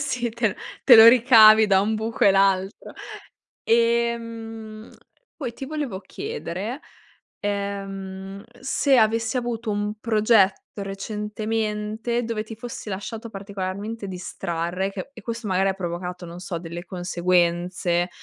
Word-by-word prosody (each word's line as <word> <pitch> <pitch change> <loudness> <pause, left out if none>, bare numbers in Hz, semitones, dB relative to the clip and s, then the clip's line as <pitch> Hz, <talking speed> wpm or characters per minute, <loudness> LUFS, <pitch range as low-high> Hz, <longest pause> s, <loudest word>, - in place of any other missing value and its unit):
sì, 250 -5 -2
te 225 -3 0 0.3
te 255 - +9
lo 225 0 +11
ricavi 220 -3 +7
da 195 -2 +4
un 215 +2 0
buco 225 +1 -1
e 200 - +7
l'altro. 195 0 +1 0.7
Ehm, 230 -1 -1 0.5
poi 255 -6 -4
ti 270 - -7
volevo 285 -10 -4
chiedere, 235 - -5 0.6
ehm, 195 -1 -5 0.2
se 270 0 +2
avessi 225 +1 +2
avuto 235 -2 -3
un 205 +1 -2
progetto 215 -3 +2
recentemente 215 +3 -3
dove 225 -2 -3
ti 220 0 -9
fossi 235 -1 -8
lasciato 220 +4 -6
particolarmente 200 +1 -5
distrarre 180 -1 -3
e - - -5
che 195 +6 -7
e 225 - -12
questo 230 0 -5
magari 190 0 +2
ha - - 0
provocato, 180 -1 -5
non 170 +1 -9
so, 180 -1 -5
delle 170 +1 -7
conseguenze 175 0 0
210 Hz, 130 wpm, -24 LUFS, 190-230 Hz, 0.7 s, lo